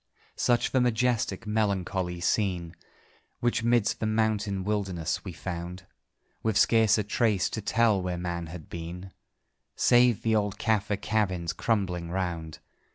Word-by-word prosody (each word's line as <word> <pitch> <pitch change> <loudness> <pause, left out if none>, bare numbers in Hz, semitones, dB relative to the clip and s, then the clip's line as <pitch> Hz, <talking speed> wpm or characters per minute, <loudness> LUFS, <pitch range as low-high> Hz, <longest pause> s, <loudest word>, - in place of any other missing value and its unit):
Such 120 -1 +1
the 130 - +3
majestic, 120 -1 0
melancholy 95 -4 -1
scene 90 -3 0 0.6
Which 120 -1 +1
'midst 115 -2 +2
that 110 - -1
mountain 110 -3 0
wilderness 95 -5 -2
we - - -6
found; 90 +1 -6 0.6
With 110 -2 0
scarce 110 -2 +5
a 105 - +1
trace 105 -1 +1
to 110 - -3
tell 110 -1 +2
where 90 -1 -2
man 85 -1 -3
had 80 -1 -9
been, 85 +3 -7 0.6
Save 120 -2 +4
the 110 -1 +2
old 105 -1 0
Caffer 105 -2 0
cabins 95 -5 -1
crumbling 90 -7 -1
round. 85 -4 -3
100 Hz, 135 wpm, -28 LUFS, 90-110 Hz, 0.6 s, scarce